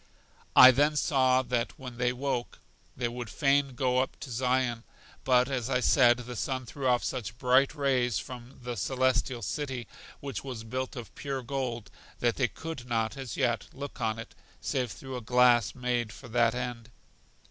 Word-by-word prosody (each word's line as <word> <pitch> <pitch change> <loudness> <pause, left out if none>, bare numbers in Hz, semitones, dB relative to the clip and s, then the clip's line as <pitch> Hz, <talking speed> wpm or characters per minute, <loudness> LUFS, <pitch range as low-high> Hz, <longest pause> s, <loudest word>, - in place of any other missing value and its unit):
I 130 - +11
then 145 +4 +2
saw 130 -3 +3
that 125 +1 -2
when 125 -4 -9
they 125 0 +2
woke, 125 -1 -3 0.4
they 120 -1 0
would 120 -1 -6
fain 140 -2 +2
go 125 0 +1
up 130 - -2
to 130 - -7
Zion; 125 -1 0 0.4
but 125 -1 +4
as 130 -3 -2
I 125 -2 +2
said, 120 -1 +5
the 125 0 -7
sun 130 +2 -2
threw 130 +3 -4
off 125 -1 +3
such 115 -3 -4
bright 130 +3 +3
rays 130 -5 +1
from 125 0 -8
The 120 0 -4
Celestial 130 +1 0
City, 130 +1 -3 0.3
which 140 -1 -5
was 125 -5 -6
built 130 +3 -4
of 120 -4 -8
pure 140 -5 -4
gold, 120 -4 -4 0.3
that 120 -1 0
they 130 - +2
could 160 -2 -7
not, 115 0 0
as 135 -5 -6
yet, 120 -3 0
look 140 +1 -8
on 110 0 0
it, 115 - -9 0.3
save 125 -3 -1
through 130 +2 -7
a - - -6
glass 120 -3 +4
made 125 -3 -1
for 125 - -11
that 115 0 +2
end. 125 -1 -5
125 Hz, 180 wpm, -29 LUFS, 120-130 Hz, 0.4 s, I